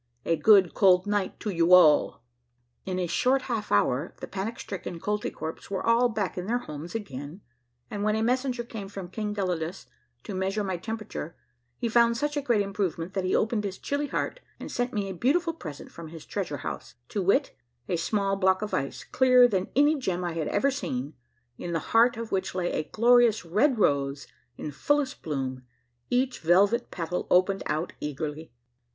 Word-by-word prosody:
A 165 - +2
cold 190 +2 +5
good 185 -1 +5
night 205 -2 -1
to 210 - -2
vou 170 0 +3
all." 155 -8 +5 0.6
In 185 -1 -2
a 180 - 0
short 255 +10 +2
half 225 -4 -3
hour 125 - +1
the - - -5
panic 200 +4 -5
stricken 180 -3 -6
Kolt3"kwerps 205 -5 -4
were 195 -1 -3
all 235 +2 +4
back 205 -5 -2
in 180 - -5
their 240 +2 +1
homes 160 -5 -7
again, 150 - -6 0.5
and 205 - -4
when 215 0 +2
a 220 - 0
messenger 250 0 0
came 220 -4 -7
from 190 -3 -8
King 210 0 -3
Gelidus 180 -3 -2 0.4
to 205 - -6
measure 190 +3 -1
my 190 -2 -2
temperature 215 -5 -6 0.4
he - - -1
found 235 0 +4
such 295 +3 -1
a 290 - 0
great 240 -6 +2
improvement 190 -3 -2
that 190 -2 -1
he 185 - +1
opened 220 -1 +1
his 195 -2 -4
chill3" 285 0 -2
heart - - -2 0.2
and - - -7
sent 245 +1 -1
me 205 -4 -2
a 190 - -4
beautiful 330 - +1
present 155 - -9
from 170 -1 -9
his 160 0 -10
treasure - - -3
house, - - -6
to 205 - -2
wit: 200 +10 +2 0.3
A 180 - 0
small 195 +3 0
block 190 0 +2
of 210 - -5
ice, 135 - -2
clearer 255 -1 +5
than 190 -4 -1
any 290 +3 +5
gem 185 -8 -2
I 175 -1 -2
had 165 -2 -2
ever 275 +7 +2
seen, 145 - -4 0.5
in 175 - -4
the - - +2 0.2
heart 230 +1 +5
of 230 -1 -6
which 190 -1 -1
la3' 180 -1 -1
a 155 - -2
glorious 235 -2 +4
red 235 - +2
rose 140 -6 +1 0.3
in 150 - -5
fullest 290 - 0
bloom, 135 -4 -3 0.5
each 255 +1 +1
velvet 200 +8 +3
petal 175 0 -3
opened 185 +2 +3
out 155 +3 -2
eagerl3'. 150 +2 -4
195 Hz, 190 wpm, -27 LUFS, 170-230 Hz, 0.6 s, cold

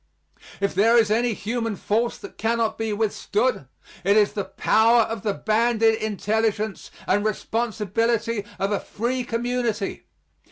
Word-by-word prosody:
If 200 0 0
there 225 +4 +4
is 220 -3 +3
any 230 0 +2
human 225 +1 -2
force 230 +5 -1
that - - -12
cannot 225 0 0
be 225 -1 -2
withstood, 210 - -1 0.4
it 200 +3 +4
is 210 -1 +3
the 200 -2 -3
power 225 +4 +3
of 225 -1 -5
the 205 -1 -1
banded 225 0 +2
intelligence 215 0 -1 0.2
and 205 +2 +1
responsibility 225 0 -1
of 195 +1 -1
a 205 - +1
free 245 +4 -3
community. 235 -3 -2
220 Hz, 135 wpm, -24 LUFS, 205-230 Hz, 0.4 s, there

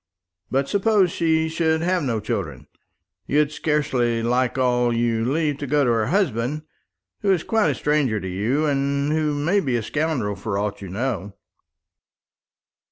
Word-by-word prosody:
But 135 +1 0
suppose 200 -3 +2
she 160 -1 +1
should 160 0 0
have 180 +1 +1
no 120 -6 -1
children, 75 -11 -4 0.6
you'd 150 +1 +2
scarcely 130 -7 0
like 125 +2 +1
all 125 -1 +2
you 115 -1 0
leave 150 -2 0
to 145 - -4
go 145 +2 +2
to 125 - +2
her 115 -2 +1
husband, 150 - 0 0.6
who 195 - +2
is 180 -4 +1
quite 220 -2 +2
a - - 0
stranger 145 -7 +1
to 95 - -6
you, 110 +12 0
and 140 0 0
who 155 -1 0
may 165 +8 +1
be 135 -9 -1
a 115 - -1
scoundrel 135 -7 -1
for 105 -2 -3
aught 105 0 -3
you 95 - -7
know." 105 -1 -3
140 Hz, 165 wpm, -23 LUFS, 115-155 Hz, 0.6 s, suppose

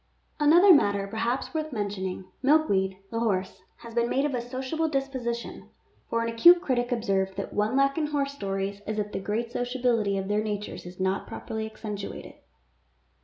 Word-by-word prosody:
Another 340 +6 +7
matter 200 -9 +3
perhaps 230 +5 -2
worth 310 -1 -2
mentioning 195 -4 -3
— - - -40
Milkweed, 205 -10 +3
the 230 - -1
horse, 190 -4 -1 0.2
has 235 -1 -9
been 235 0 +1
made 275 +2 +1
of 295 - -1
a 245 - -1
sociable 260 +6 -2
disposition, 260 -4 -3 0.4
for 230 0 0
an - - -1
acute 340 +11 +7
critic 250 -6 -1
observed 195 -5 0
that 195 - -5
one 210 +4 +1
lack 275 +2 +3
in 305 - 0
horse 285 -2 -1
stories 195 -4 -3
is 215 0 -2
that 210 -1 -2
the - - -3
great 220 +4 -2
sociability 245 -5 0
of 190 0 -3
their 210 +1 +1
natures 210 -3 -4
is 180 +1 -11
not 190 +1 -1
properly 220 0 -5
accentuated. 210 -2 -7
230 Hz, 175 wpm, -27 LUFS, 200-270 Hz, 0.4 s, Another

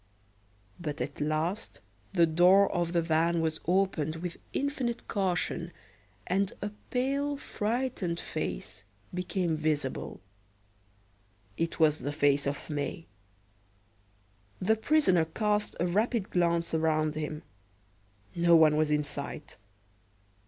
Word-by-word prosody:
But 150 -4 -4
at 135 +4 -4
last 155 +7 -1 0.3
the 175 -4 +5
door 180 +5 +5
of 175 -2 0
the 170 -1 +2
van 165 +1 +2
was 160 -1 0
opened 175 -4 +1
with 170 +1 -5
infinite 265 -4 -2
caution, 175 -3 -1 0.5
and 195 +2 +1
a 205 - -3 0.2
pale, 280 +3 0
frightened 220 -8 -2
face - - -4 0.3
became 180 -2 -1
visible. 155 - -2 1.4
It 165 +1 -2
was 155 -1 +4
the 145 - -3
face 145 -1 +2
of 140 - -3
May. 150 +2 -3 1.5
The 220 +4 +3
prisoner 220 - +3
cast 210 +5 -1
a 175 - +2
rapid 210 +3 0
glance 170 -2 +1
around 155 -1 +2
him. 155 0 -4 0.9
No 170 0 +5
one 155 -2 +6
was 155 -1 +2
in 150 0 +2
sight. 145 +1 -6
170 Hz, 115 wpm, -29 LUFS, 155-195 Hz, 1.5 s, one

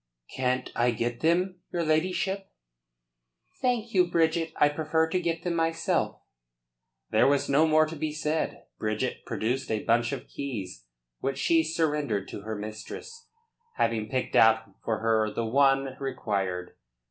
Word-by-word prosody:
"Can't 130 0 -1
I 120 +1 +3
get 120 0 -2
them, 180 +3 +1
your 170 -1 -1
ladyship?" 185 +5 0 1.1
"Thank 240 -3 0
you, 180 -2 +4
Bridget. 165 -1 +2
I 150 - +5
prefer 160 +2 +1
to 180 +3 0
get 165 -1 -2
them, 175 - -1
myself." 165 0 0 0.9
There - - +5
was 140 0 +2
no 150 +4 +4
more 155 0 +5
to 155 +1 -6
be 155 0 -2
said. 155 +1 -2 0.2
Bridget 110 0 -2
produced 125 +4 -1
a 110 -1 -1
bunch 120 +1 +2
of - - -5
keys, 100 - -6 0.3
which 135 0 -2
she 165 +3 +3
surrendered 150 - 0
to - - -7
her 110 +2 -4
mistress, 110 - -8 0.5
having 110 -2 0
picked 130 -1 -2
out 110 -2 +5
for 110 -2 -1
her 110 -1 +2
the 115 - -2
one 135 +2 +3
required. 95 -9 -2
140 Hz, 145 wpm, -28 LUFS, 115-165 Hz, 1.1 s, I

